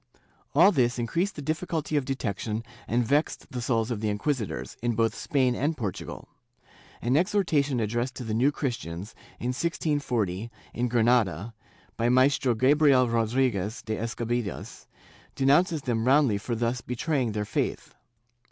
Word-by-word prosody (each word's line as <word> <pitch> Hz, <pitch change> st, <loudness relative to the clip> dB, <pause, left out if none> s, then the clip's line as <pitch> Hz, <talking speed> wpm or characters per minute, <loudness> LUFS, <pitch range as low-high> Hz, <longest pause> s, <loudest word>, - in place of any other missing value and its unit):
^ -, -, -30 dB, 0.4 s
All 175 Hz, +7 st, +7 dB
this 125 Hz, -8 st, +2 dB
increased 170 Hz, -, -1 dB
the 145 Hz, -, -6 dB
difficulty 155 Hz, 0 st, -2 dB
of 145 Hz, -3 st, +1 dB
detection 110 Hz, -4 st, -3 dB, 0.2 s
and 120 Hz, +1 st, +1 dB
vexed 145 Hz, +6 st, 0 dB
the 125 Hz, -, -4 dB
souls 115 Hz, -1 st, 0 dB
of 110 Hz, -3 st, -3 dB
the 110 Hz, -, 0 dB
inquisitors, 105 Hz, -, -2 dB
in 120 Hz, -1 st, 0 dB
both 115 Hz, 0 st, +2 dB
Spain 130 Hz, -5 st, +1 dB
and 150 Hz, +5 st, -1 dB
Portugal. 105 Hz, -7 st, -5 dB, 0.8 s
An 120 Hz, +3 st, +2 dB
exhortation 155 Hz, -, +2 dB
addressed 120 Hz, +4 st, -1 dB
to 125 Hz, -, -6 dB
the 110 Hz, -2 st, -3 dB
New 125 Hz, +6 st, +3 dB
Christians, 115 Hz, -, -4 dB, 0.3 s
in 120 Hz, -, -2 dB
1640, 125 Hz, -, -1 dB, 0.2 s
in 125 Hz, +1 st, 0 dB
Granada, 115 Hz, -4 st, +2 dB, 0.4 s
by 115 Hz, +1 st, +2 dB
Maestro 130 Hz, 0 st, +3 dB
Gabriel 135 Hz, +1 st, +4 dB
Rodriguez 115 Hz, -2 st, 0 dB
de 110 Hz, -1 st, -2 dB
Escabias, 115 Hz, -2 st, -4 dB, 0.5 s
denounces 150 Hz, +4 st, +3 dB
them 115 Hz, -3 st, 0 dB
roundly 135 Hz, -6 st, +4 dB
for 120 Hz, +3 st, -3 dB
thus 120 Hz, +1 st, -1 dB
betraying 125 Hz, -1 st, -1 dB
their 105 Hz, 0 st, -2 dB
faith. -, -, -2 dB
125 Hz, 145 wpm, -27 LUFS, 115-140 Hz, 0.8 s, All